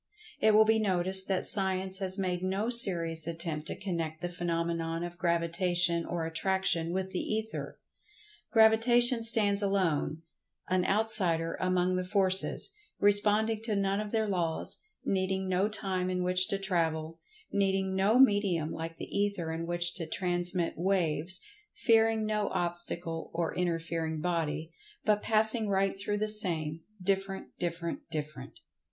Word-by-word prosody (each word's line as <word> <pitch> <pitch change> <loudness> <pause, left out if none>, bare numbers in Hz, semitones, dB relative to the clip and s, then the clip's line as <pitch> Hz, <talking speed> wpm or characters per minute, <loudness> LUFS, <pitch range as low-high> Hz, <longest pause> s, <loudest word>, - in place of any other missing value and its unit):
It 215 0 +4
will 220 0 +7
be 220 0 +3
noticed 190 -2 +1
that 190 -2 0
Science 190 -1 +1
has 190 0 +1
made 180 -2 -1
no 195 +5 -1
serious 170 -8 +3
attempt 165 -2 -3
to - - -4
connect 165 -5 -4
the 175 - -3
phenomenon 170 -1 -2
of 175 0 -7
Gravitation 170 0 +1
or 170 -2 -2
Attraction 170 0 0
with 190 +1 -3
the 185 - -1
Ether. 220 0 -4 0.7
Gravitation 230 +2 +5
stands 215 -3 +4
alone—an 180 -1 -2
"outsider" 190 -6 +1
among 185 0 +1
the 185 - -1
Forces, 190 - +1 0.3
responding 210 +2 +2
to 225 -2 -2
none 195 0 0
of 210 0 -4
their 220 -1 0
laws—needing 190 - -2
no 185 +2 +1
time 190 -4 0
in 180 -1 -1
which 180 +1 +1
to 195 - -1
travel—needing 190 - -2
no 200 +5 +3
medium 200 -10 +3
like 165 0 -6
the - - -6
Ether 200 -5 -2
in 165 +1 -4
which 175 0 -1
to 165 -3 -4
transmit 175 0 -1
"waves"—fearing 215 - +1
no 210 -1 -1
obstacle 175 -1 -3
or 165 -1 -1
interfering 165 -2 -2
body, 165 -1 -2 0.3
but 210 -1 +2
passing 220 0 +2
right 195 0 +1
through 205 +1 -2
the 215 +1 -1
same—different, 195 +1 -1
different, 170 -1 -3
different. 150 -4 -7
185 Hz, 135 wpm, -30 LUFS, 170-205 Hz, 0.7 s, will